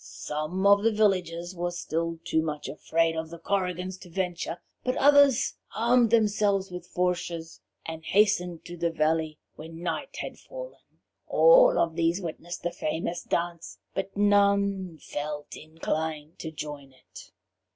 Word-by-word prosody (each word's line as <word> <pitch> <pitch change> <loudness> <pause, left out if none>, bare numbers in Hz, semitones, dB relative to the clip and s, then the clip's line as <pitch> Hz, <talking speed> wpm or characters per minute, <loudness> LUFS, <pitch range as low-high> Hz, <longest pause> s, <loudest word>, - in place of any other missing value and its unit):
Some 155 +6 -4
of 200 0 +7
the 225 +2 +3
villagers 180 -5 +1
were 175 0 -1
still 165 -1 -3
too 160 -2 +1
much 150 -2 -4
afraid 165 +1 0
of 160 0 -4
the 170 - -8
Korrigans 185 0 -2
to 180 - -12
venture, 175 -1 -3 0.3
but 255 0 -1
others 285 -3 +5 0.2
armed 235 +1 +4
themselves 205 -3 +2
with 180 0 -7
fourches, 175 -2 -2 0.2
and 160 0 -6
hastened 180 -3 +2
to 175 - -7
the 170 0 +1
valley 160 -1 0 0.2
when 165 +2 -9
night 340 - -3
had - - -6
fallen. - - -9 0.5
All - - +6
of 165 -1 +1
these 170 +2 +1
witnessed 175 -1 -6
the 175 - -1
famous 170 +2 -3
dance, 170 - -3 0.2
but 195 +1 -4
none 200 -3 +3
felt 150 0 -5
inclined 155 -1 -4
to 160 - -5
join 145 -3 -7
it. 130 - -14
175 Hz, 145 wpm, -27 LUFS, 160-200 Hz, 0.5 s, of